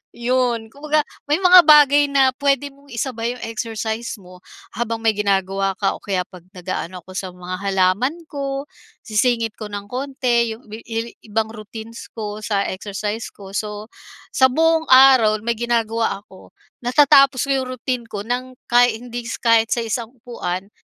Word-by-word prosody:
iyon. 240 -2 0
Kumbaga 300 +1 0 0.3
may 295 - +3
mga 365 -1 +8
bagay 290 -1 +6
na 270 -2 +4
puwede 280 0 0
mong 280 +1 -22
isabay 235 0 -2
'yong 250 - -10
exercise 225 0 -4
mo, 180 -2 -15 0.3
habang 230 -1 -3
may 225 - +4
ginagawa 195 -1 0
ka 195 - 0
o - - -57
kaya 190 -3 -1
kapag 180 -1 -15
nagaano 180 0 -5
ako 185 - -12
sa 185 0 -4
mga 180 0 -6
halaman 195 - +1
ko, 275 -1 -4 0.4
sisingit 225 0 +1
ko 215 -2 -6
ng 205 -1 -6
konti 250 -1 0
'yo - - -17
'yong 225 +2 -6 0.2
ibang 220 +1 0
routines 220 +1 -10
ko 210 -1 -6
sa 205 -2 -1
exercise 205 +3 -4
ko, 195 -1 -13
so 210 0 -4 0.5
sa 260 -1 +5
buong 320 +3 +2
araw 255 -5 +7
may 235 - +1
ginagawa 230 -3 -1
ako, 190 - -16 0.3
natatapos 270 +1 +5
ko - - -9
'yong 260 -1 -1
routine 250 +1 -2
ko 205 -1 -6
ng 250 +2 -4
kahit 240 -2 +4
hindi 240 +1 -7 0.2
kahit 230 -1 +3
sa 240 - 0
isang 225 0 -3
upuan 195 -5 -5
230 Hz, 160 wpm, -20 LUFS, 210-255 Hz, 0.5 s, mga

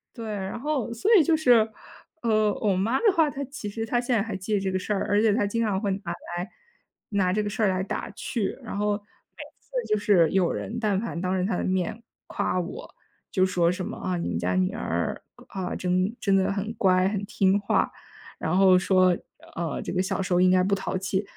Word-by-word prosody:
对， 230 -3 -6
然 200 0 -4
后 285 -4 -2
所 235 - -1
以 330 - +6
就 320 0 +3
是， 240 -7 +4 0.5
呃， 215 -2 +2
我 205 -3 +2
妈 220 +8 +1
的 430 -4 +4
话， 320 -2 +4
她 280 0 -5
其 260 -6 -7
实 225 +2 -4
她 240 +1 0
现 245 0 0
在 215 - +2
还 220 -4 -5
记 190 +3 -4
得 205 - +3
这 190 -1 -2
个 185 - 0
事 210 - -2
儿， 195 - -1
而 205 +1 +3
且 220 - +4
她 205 -2 +1
经 230 +3 -1
常 205 -4 0
会 200 -1 -1
拿 190 -3 -4 0.3
来 180 +5 -4 0.6
拿 195 -3 +1
这 210 - +1
个 205 - -2
事 220 +2 -2
儿 205 - +4
来 185 0 0
打 - - -4
趣。 225 -6 -3
然 - - -6
后 210 0 +1
每 205 0 -13 0.2
次 - - -34 0.2
就 215 - +2
是 200 -5 +4
有 190 -3 +2
人 230 - -4
但 205 -4 +1
凡 220 -6 -4
当 185 0 -1
着 180 - 0
她 195 - 0
的 - - -2
面 185 +4 -1 0.3
夸 185 - -1
我。 175 - -7 0.4
就 185 -1 +3
说 175 -2 +2
什 180 0 -4
么， - - -5
啊， 185 -1 -2
你 170 - -3
们 85 - -2
家 90 +1 0
女 90 0 +1
儿， - - -2 0.3
啊， 185 -2 -4
真 185 +4 0
真 195 -1 +2
的 190 0 +2
很 205 +3 -3
乖、 185 -4 +3
很 205 0 -2
听 195 0 +2
话， 200 - +1 0.5
然 170 +4 0
后 190 -1 +6
说， 185 -1 +4 0.4
呃， 165 -1 -3
这 - - -4
个 180 - +1
小 185 - -2
时 185 -1 -1
候 175 - +4
应 185 - +5
该 185 0 +4
不 200 +2 +1
淘 190 -1 -1
气。 190 +1 -1
195 Hz, 255 characters per minute, -26 LUFS, 185-220 Hz, 0.6 s, 以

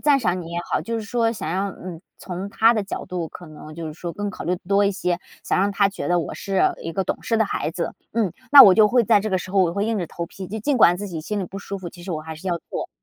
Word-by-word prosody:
赞 290 -2 +4
赏 180 -6 0
你 165 - -8
也 170 - -3
好， - - +1
就 230 - -4
是 225 - -3
说 230 +2 0
想 160 -8 -5
要， 190 +3 0
嗯， 175 -3 -9 0.2
从 185 +2 -6
她 225 +3 +4
的 215 -3 0
角 195 - -5
度， 175 -3 -4
可 175 - -11
能 155 0 -11
就 165 -1 -6
是 155 - -5
说 170 +1 -6
更 205 0 -3
考 - - -8
虑 180 +1 0
多 200 +1 +3
一 - - +2
些， 180 -2 -1 0.3
想 - - +1
让 200 +1 +2
她 200 0 +3
觉 195 - -5
得 175 0 +3
我 165 - -3
是 195 -2 -1 0.2
一 165 - -4
个 190 +1 -1
懂 - - -3
事 225 - 0
的 220 - +3
孩 180 - -2
子。 170 +1 -4 0.2
嗯， 215 -7 0 0.2
那 285 -1 +12
我 190 -3 +8
就 215 -1 +6
会 245 -1 +3
在 215 -2 +4
这 215 - -3
个 190 - +1
时 185 - -8
候 195 -1 +4
我 170 -1 +1
会 200 +2 -1
硬 225 -2 0
着 175 - -2
头 170 - -5
皮， 185 +2 -9
就 220 +4 -5
尽 270 +5 0
管 175 -4 +6
自 205 +2 -5
己 165 -3 -5
心 205 +6 -3
里 - - -2
不 195 +3 -8
舒 200 0 -6
服， 175 -2 -7
其 175 - -13
实 185 - -7
我 155 -2 -3
还 160 0 -7
是 185 +5 -6
要 175 - +1
做。 - - -4
190 Hz, 340 characters per minute, -23 LUFS, 175-210 Hz, 0.3 s, 那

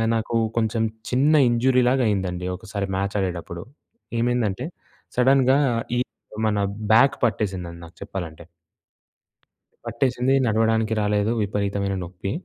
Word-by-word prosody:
నాకు 115 +1 -2 0.2
కొంచెం 110 0 +1 0.3
చిన్న 135 +5 +3 0.2
ఇంజురీలాగా 125 +2 +3
అయిందండి 90 -3 -2
ఒకసారి 100 +1 -4
మ్యాచ్ 100 +1 -2
ఆడేటప్పుడు. 85 -2 -4 0.6
ఏమైందంటే 120 -2 0 0.5
సడెన్‌గా 130 +1 +4 0.4
ఈ - - +2 0.5
మన 105 -1 0 0.4
బ్యాక్ 135 +5 +5
పట్టేసిందండి 95 -6 -2
నాకు 85 - -16
చెప్పాలంటే. 85 -4 -7 1.4
పట్టేసింది. 130 0 +1
నడవడానికి 110 0 +2
రాలేదు. 105 +1 +1
విపరీతమైన 100 -1 -1
నొప్పి. 90 +2 -6
105 Hz, 100 wpm, -23 LUFS, 95-120 Hz, 1.4 s, బ్యాక్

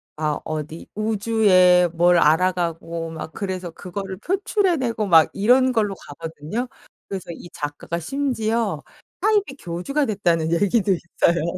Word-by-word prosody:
아 155 -1 -1
어디 155 +1 -5
우주에 200 -4 +4
뭘 175 +1 +4
알아가고 165 0 +1
막 160 0 -7
그래서 185 -3 -4
그거를 190 +2 -6
표출해 385 - 0
내고 230 -4 -1
막 165 -5 +6
이런 255 +5 +3
걸로 210 -4 +1
가거든요. 165 - -6 0.4
그래서 190 -3 -6
이 175 - -11
작가가 145 +3 -5
심지어 230 - -1 0.4
사이비 415 -9 +1
교주가 275 - -2
됐다는 170 -7 0
얘기도 200 +2 +2
있어요. 170 -1 0
185 Hz, 295 characters per minute, -22 LUFS, 165-225 Hz, 0.4 s, 막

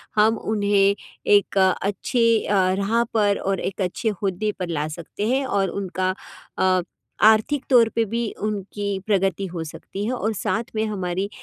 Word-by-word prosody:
हम 220 +1 +4 0.2
उन्हें 200 -1 +3 0.4
एक 200 -1 +4
अच्छे 205 +5 +2
अ, - - 0 0.3
राह 225 +4 +2
पर 205 -2 +3
और 195 -1 -1
एक 195 +1 -4
अच्छे 190 +5 -1
औहदे 200 +1 -2
पर 180 -2 -3
ला 155 -2 -1
सकते 190 +5 -4
हैं 265 +2 +1
और 200 -6 0
उनका 185 -1 -2 0.5
अ, 185 -1 +3 0.5
आर्थिक 220 +6 +3
तौर 240 -4 +6
पे 230 0 +2
भी 230 +1 -2
उनकी 205 -1 -3
प्रगति 195 -2 +1
हो 170 -2 -5
सकती 165 +5 -7
है 230 - -1
और 220 -3 -1
साथ 220 +3 -1
में 220 0 +1
हमारी 190 -2 -2
200 Hz, 165 wpm, -23 LUFS, 190-220 Hz, 0.5 s, तौर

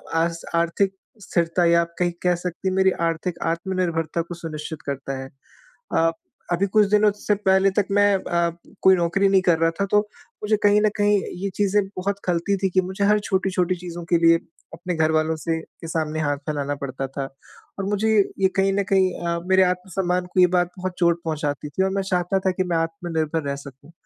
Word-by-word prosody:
आस 165 0 0
आर्थिक 170 +4 +1 0.3
स्थिरता 170 -1 0
या 170 0 +5
आप 170 0 -5
कहीं 175 -1 +2
कह 180 0 +3
सकती 180 +1 -5
हैं 185 - -2
मेरी 190 0 +4 0.2
आर्थिक 165 +2 -3 0.2
आत्मनिर्भरता 170 -2 -2
को 175 +1 -7
सुनिश्चित 160 -2 -7
करता 135 -1 -4
है। 130 - -10 0.7
अ, 165 0 +3 0.4
अभी 185 +3 +1
कुछ 210 +1 +3
दिनों 210 0 +5
से 210 0 0
पहले 195 -1 +3
तक 200 - 0
मैं 205 0 +4
अ, 170 -2 0 0.3
कोई 190 0 +6
नौकरी 180 +3 +2
नहीं 195 -1 +4
कर 175 -3 +3
रहा 165 0 +3
था - - +3
तो 210 - +6 0.4
मुझे 215 0 +2
कहीं 205 0 +5
न 215 - +4
कहीं 205 0 +3 0.3
ये 200 - 0
चीज़ें 205 0 +2 0.2
बहुत 200 +2 -2
खलती 180 +2 +1
थी 190 - +3
कि 185 +1 +2
मुझे 190 +2 -3
हर 210 +1 +4
छोटी-छोटी 185 -2 0
चीज़ों 175 -1 -7
के 170 - +5
लिए 165 0 +7 0.4
अपने 175 0 -4
घर 160 0 +2
वालों 155 0 +1
से 160 0 -2
के 165 - -13
सामने 155 -1 -2
हाथ 145 -1 0
फैलाना 145 -1 -2
पड़ता 135 0 -4
था। 135 +1 -5 0.5
और 195 - -2
मुझे 205 +2 0 0.3
ये 190 - +4
कहीं 195 0 +3
न 200 0 +1
कहीं 190 -1 +4 0.2
अ, 170 0 0
मेरे 190 0 +6
आत्म-सम्मान 180 0 -1
को 185 - +2
ये 180 - +7
बात 175 0 +2
बहुत 185 0 -3
चोट 170 -1 +2
पहुँचाती 150 -2 -3
थी 190 +7 0
और 190 - 0
मैं - - -1
चाहता 180 +2 +1
था - - +4
कि 185 +1 -1
मैं 175 -2 -1
आत्मनिर्भर 165 -2 -2
रह 140 - -1
सकूँ। 135 +4 -13
180 Hz, 205 wpm, -23 LUFS, 165-195 Hz, 0.7 s, लिए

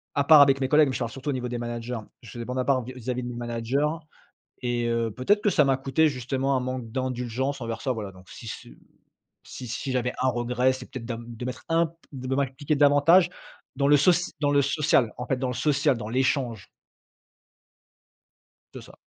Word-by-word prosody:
à 140 0 +1
part 155 -2 +9
avec 135 -1 +5
mes 130 - 0
collègues, 150 0 +5
mais - - -3
je - - -2
te - - -1
parle 115 - -4
surtout 135 +2 -6
au - - +1
niveau 125 -1 -3
des 120 0 -4
managers. 120 0 -4 0.2
Je 115 - -13
faisais 120 -1 -6
bande 125 +1 -3
à 125 - 0
part 130 -3 +2
vis-à-vis 125 0 -5
de - - -5
mes 120 - -6
managers 120 +4 -1 0.8
et 120 -1 -1
heu, 115 -1 0
peut-être 205 - +1
que 205 - +4
ça 150 - +4
m'a 135 -1 +3
coûté 140 +4 +2
justement 135 0 -1
un - - 0
manque 125 -2 -4
d'indulgences 130 +1 -2
envers 115 -1 -4
ça. 130 - -1
Voilà, 105 -5 -4
donc 95 0 -17
si 115 - -10
c - - -8
heu, - - -16 0.7
si 125 - -9
si 130 +3 -4
j'avais 125 -1 -1
1 130 - +3
regret, 125 +1 +1
c'est 130 - -8
peut-être 125 -3 -7
d'am 115 -1 -5
de 120 +1 -7
mettre 125 - -6
un 165 0 +3
p 165 - -21 0.2
de 130 0 -3
m'appliqué 140 +2 -1
d'avantage 145 +5 +5 0.5
dans 140 0 +2
le 145 0 +6
soci 175 +4 +3
dans 145 -1 +2
le 140 0 +4
social, 140 -5 +2
en 125 - -4
fait, 130 - 0
dans 130 0 -2
le 125 - -3
social 145 +1 +2
dans 105 -1 -6
l'échange. 130 -3 -1 2.1
C'est - - -9
ça. - - -15
130 Hz, 225 wpm, -26 LUFS, 120-140 Hz, 2.1 s, part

